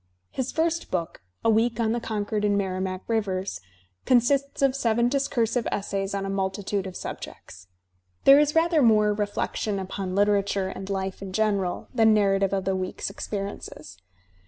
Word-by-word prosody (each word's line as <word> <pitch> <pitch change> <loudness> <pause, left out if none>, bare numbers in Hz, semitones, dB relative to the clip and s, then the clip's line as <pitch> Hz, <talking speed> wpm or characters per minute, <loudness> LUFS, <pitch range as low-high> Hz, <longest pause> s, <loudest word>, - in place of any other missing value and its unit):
His 260 -1 -3
first 330 +1 0
book, 170 - -3 0.2
"A - - +5
Week 230 +1 +2
on 225 -1 +1
the 240 - 0
Concord 210 -2 -2
and 205 -1 +2
Merrimac 185 -1 -2
Rivers," 195 - -2 0.4
consists 275 +3 +2
of 270 -1 +3
seven 235 -2 +2
discursive 245 -3 0
essays 195 0 -2
on 195 0 -2
a - - -3
multitude 195 0 -2
of 185 - -8
subjects. 90 +1 -8 0.6
There 275 +1 +8
is 295 +1 +2
rather 325 -1 +4
more 215 -3 +4
reflection 205 0 -2
upon 190 0 -4
Uterature 200 -1 +1
and 190 +1 -7
life 190 -1 -3
in 190 -1 -7
general 200 -4 0
than 220 -3 +5
narrative 195 -2 +2
of 195 -1 -1
the 190 0 +1
week's 185 +1 -4
experiences. 195 - -6
205 Hz, 160 wpm, -25 LUFS, 195-230 Hz, 0.6 s, There